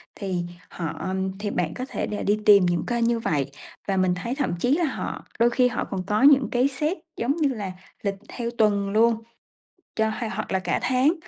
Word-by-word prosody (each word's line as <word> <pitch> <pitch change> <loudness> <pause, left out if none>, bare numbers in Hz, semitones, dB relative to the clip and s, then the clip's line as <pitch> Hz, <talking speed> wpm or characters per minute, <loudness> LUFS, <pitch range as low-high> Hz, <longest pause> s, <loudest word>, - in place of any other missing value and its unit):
thì 185 -4 -2 0.3
họ 175 +2 -4 0.3
thì 205 0 -2
bạn 170 -4 -1
có 255 - -4
thể - - -2
là 210 - -3
đi 210 +1 +2
tìm 200 -3 +7
những 175 -2 0
kênh 235 -1 0
như 235 0 +2
vậy, 140 - -1 0.4
và 195 -1 0
mình 185 -1 +2
thấy 235 +8 -3
thậm 270 - -1
chí 255 - +2
là 350 - +2
họ 285 - -4
đôi 235 +1 +5
khi 250 +1 +3
họ 245 - -2
còn 190 -2 -2
có 210 +1 +1
những 275 -5 +6
cái 250 +2 +3
set, 300 +7 -1 0.2
giống 255 +5 0
như 300 -4 +2
là, 210 -7 -4 0.3
lịch 200 -1 0
theo 235 -2 -3
tuần 205 -3 +2
luôn 225 +1 +3 0.7
cho 220 0 +2
ha 225 +1 -3
hoặc 215 +1 -4
là 190 - +2
cả 180 -2 -1
tháng 255 +5 +3
220 Hz, 220 wpm, -25 LUFS, 190-250 Hz, 0.7 s, tìm